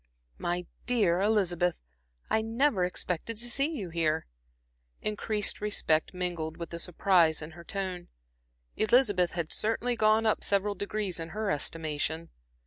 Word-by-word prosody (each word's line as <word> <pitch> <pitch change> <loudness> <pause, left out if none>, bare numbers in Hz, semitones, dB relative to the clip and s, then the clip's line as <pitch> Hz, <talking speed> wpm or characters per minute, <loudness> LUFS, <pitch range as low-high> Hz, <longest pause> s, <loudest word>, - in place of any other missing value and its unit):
"My 175 +1 -1 0.2
dear 205 -8 +3
Elizabeth, 180 -5 +2 0.5
I 220 - +2
never 225 -2 +2
expected 180 +4 -3
to 240 +2 -2
see 275 +4 +2
you 205 - -5
here." 160 -1 +1 0.8
Increased 210 0 0
respect 160 -7 +1
mingled 175 -3 -3
with 170 -1 -6
the 170 - -4
surprise 175 -2 +3
in 155 +1 -7
her 170 +2 -12
tone. 185 -2 -4 0.7
Elizabeth 215 -6 +3
had 170 -2 -3
certainly 230 +3 0
gone 215 0 +4
up 215 - +2
several 200 +1 +2
degrees 200 -1 -3
in 165 0 -5
her 215 -2 0
estimation. 160 +2 -2
185 Hz, 135 wpm, -29 LUFS, 170-215 Hz, 0.8 s, gone